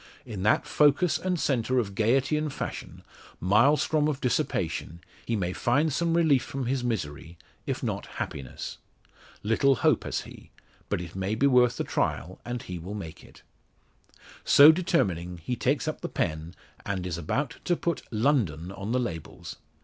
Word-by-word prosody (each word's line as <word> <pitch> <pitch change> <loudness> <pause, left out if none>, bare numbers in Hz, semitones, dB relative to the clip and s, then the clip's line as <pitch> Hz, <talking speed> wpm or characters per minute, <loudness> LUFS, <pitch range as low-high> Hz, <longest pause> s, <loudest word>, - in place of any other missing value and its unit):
In 110 -6 -6
that 105 +3 +3
focus 150 +4 +3
and 180 -2 -1
centre 130 -3 +1
of 105 -5 0
gaiety 125 +8 +2
and 150 -1 -1
fashion - - -6 0.4
Maelstrom 145 - +3
of 145 -3 -1
dissipation 85 - -1 0.3
he 115 - 0
may 90 -3 -1
find 140 +9 +1
some 170 +2 +1
relief 155 -6 +4
from 135 0 -4
his 130 +1 -1
misery, 85 -8 -4 0.3
if - - -3
not - - -3
happiness. 65 -3 -6 0.6
Little 125 +6 +3
hope - - +2
has - - -2
he; - - -13 0.4
but - - -1
it 85 0 -9
may 95 +3 -1
be 130 - +2
worth 125 -3 +4
the - - -1
trial 90 +3 -2
and 120 -1 -5
he 90 -1 -6
will 95 +5 -7
make 85 -6 -8
it. - - -17 1.0
So 145 +2 +9
determining, 95 - 0
he 85 +10 -3
takes 140 +6 0
up 155 - -3
the - - -4
pen, 80 0 -3 0.3
and 95 -3 -3
is 85 -2 -3
about 125 - -2
to 175 - +2
put 170 -2 -2
"London" 105 - +1
on 100 +3 -4
the 125 - +2
labels. 80 -11 -6
120 Hz, 165 wpm, -27 LUFS, 90-140 Hz, 1.0 s, So